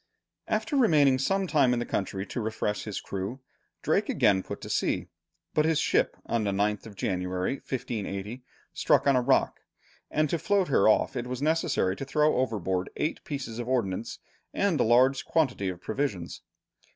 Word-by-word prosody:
After 300 - -1
remaining 150 - +4
some 195 +8 +1
time 140 -8 +3
in - - 0
the 120 - -2
country 95 0 -3
to 120 - -4
refresh 105 -1 -2
his 105 -3 -4
crew, 100 +7 -5 0.4
Drake - - +1
again 95 -2 +3
put - - -7
to - - -8
sea, - - 0 0.4
but 155 - +3
his 160 0 +2
ship - - +1
on 115 -2 0
the 105 - 0
9th 105 +2 0
of 105 - -12
January, 90 +5 -2
1580, 115 -3 -5 0.3
struck - - +2
on 140 -1 +4
a 125 - +3
rock, 130 +2 +2 0.5
and 155 +1 +1
to 170 - 0
float 200 -3 +1
her 110 -6 +4
off 110 - +2
it 125 -1 -3
was 125 0 -4
necessary 155 - +1
to - - -5
throw 150 +1 +2
overboard 95 -7 -1
eight 155 - -2
pieces 130 -6 -5
of 120 - -4
ordnance 115 -4 -1 0.4
and 195 -7 +1
a - - +4
large 130 +4 +4
quantity 130 - 0
of 90 -1 -6
provisions. 105 -5 -3
120 Hz, 175 wpm, -28 LUFS, 100-145 Hz, 0.5 s, remaining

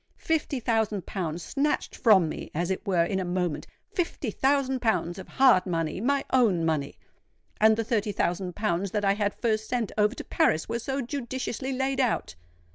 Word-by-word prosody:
Fifty 305 -4 -1
thousand 220 -4 0
pounds 170 -3 -4
snatched 295 +1 -1
from 200 -8 +5
me - - -6
as 175 +3 -1
it 190 - -3
were 180 -3 +3
in 190 +2 -1
a - - -1
moment,—fifty 180 - -3
thousand 265 +1 +1
pounds 180 -5 0
of 190 - -9
hard 250 -9 +4
money—my 185 - 0
own 210 -10 +3
money! 150 -3 -1 0.6
And 220 0 +5
the 225 - 0
thirty 215 -2 0
thousand 180 -1 -1
pounds 200 -2 -1
that 205 +1 -1
I 195 - +4
had 205 0 -1
first 220 -2 -1
sent 240 -4 -1
over 210 +4 +3
to - - -6
Paris 155 0 +1
were 230 +1 -2
so 270 +3 -2
judiciously 260 0 -4
laid 265 +1 -1
out! 245 -3 0
215 Hz, 175 wpm, -27 LUFS, 180-255 Hz, 0.6 s, from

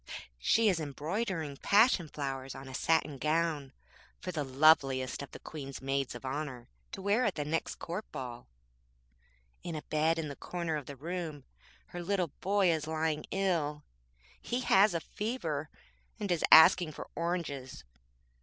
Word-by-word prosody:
She 220 - +3
is 185 -5 +3
embroidering 155 - -3
passion 205 - +4
fowers 135 -2 -4
on 135 - -9
a 130 - -9
satin 150 0 +1
gown 155 -3 0 0.5
for 180 - -5
the 155 -4 -2
loveliest 135 -2 +3
of 140 - -7
the - - -10
Queen's 140 -3 -8
maids 135 -1 -1
of 120 - -9
honour 130 -3 -4 0.3
to 195 -3 -6
wear 205 +5 +2
at 210 -6 +1
the 150 - -2
next 165 +2 -1
Court 180 +6 -6
ball. 120 -2 -7 1.1
In 170 - -5
a 150 - -5
bed 155 +2 +1
in 160 -2 -2
the 140 - -6
corner 170 0 -3
of 145 -3 -5
the 140 - -7
room 160 -1 -5 0.5
her 175 - -6
little 180 -3 0
boy 195 -2 +3
is 155 -2 -1
lying 155 -1 -1
ill. 165 -6 0 0.6
He 245 +1 -2
has 195 -5 +5
a - - +1
fever, 165 - -3 0.5
and 200 -3 -2
is 170 - +1
asking 160 0 +8
for - - -8
oranges. 165 -7 -3
155 Hz, 160 wpm, -31 LUFS, 140-180 Hz, 1.1 s, asking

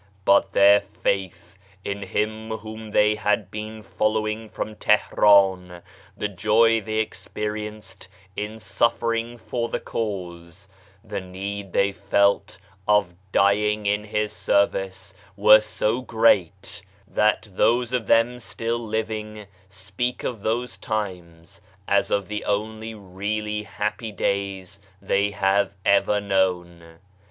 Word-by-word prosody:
But 100 0 +4
their 100 +1 +7
faith 95 -2 -4 0.3
in 100 0 -3
Him 110 +2 -2
whom 110 0 -7
they 105 0 +4
had 105 -2 -1
been 110 0 -7
following 110 +1 -1
from 110 - -5
Tihran; 95 -4 +3 0.3
the 105 - -1
joy 110 +4 +3
they 110 +1 -1
experiencedin 105 -2 -7
sufferingfor 115 +3 -1
the - - -2
Cause; 90 -3 -6 0.4
the 105 -2 -4
need 95 +1 -6
they 100 +2 +2
felt 100 -1 +1 0.3
of 105 -4 +3 0.2
dying 105 +2 +2
in 105 +1 +1
his 105 0 -2
service 95 -2 0 0.2
were 105 +1 +8
so 110 +2 -1
great, 100 -7 +1 0.3
that 105 +1 +1
those 120 +5 +2
of 120 -5 -1
them 120 +2 +3
still 115 0 -3
'AKKA 110 -2 -5
85 110 0 0
living 110 -1 -6 0.2
speak 100 +6 -4
of 115 -5 -4
those 110 -2 -2
times 95 -3 -5 0.3
as 100 0 +2
of 100 -2 0
the 105 0 -4
only 110 +2 -3
really 105 +2 -3
happy 105 +2 -4
days 100 -1 -3 0.2
they 100 +1 +1
have 100 0 +1
ever 100 +1 +3
known. 90 -4 -1
105 Hz, 120 wpm, -24 LUFS, 95-110 Hz, 0.4 s, were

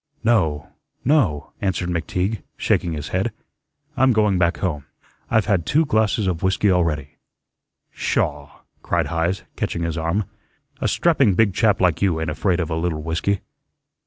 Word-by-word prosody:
"No, 80 -11 +2 0.4
no," 115 - +1
answered 90 -2 -1
McTeague, 90 +5 -1 0.2
shaking 85 - +1
his 75 -1 -5
head. 95 +8 0 0.6
"I'm 130 -1 +4
going 105 -4 +2
back 85 -1 +2
home. 80 -7 -2 0.4
I've 110 -2 +3
had 95 -5 +1
two 155 - +2
glasses 110 -4 +1
of 90 -3 -1
whiskey 95 +2 +2
already." 75 -6 0 0.7
"Sha!" 75 -1 -1 0.3
cried 85 -2 0
Heise, 85 +3 0
catching 85 - -2
his 85 0 -2
arm. 85 +6 0 0.6
"A - - 0
strapping 140 - +3
big 105 -2 +3
chap 105 +1 +2
like 85 -4 +2
you 90 -5 +2
ain't 80 -1 -2
afraid 90 +2 0
of 85 -2 -2
a - - 0
little 80 -2 -2
whiskey." 85 +5 -1
90 Hz, 155 wpm, -22 LUFS, 80-105 Hz, 0.7 s, I'm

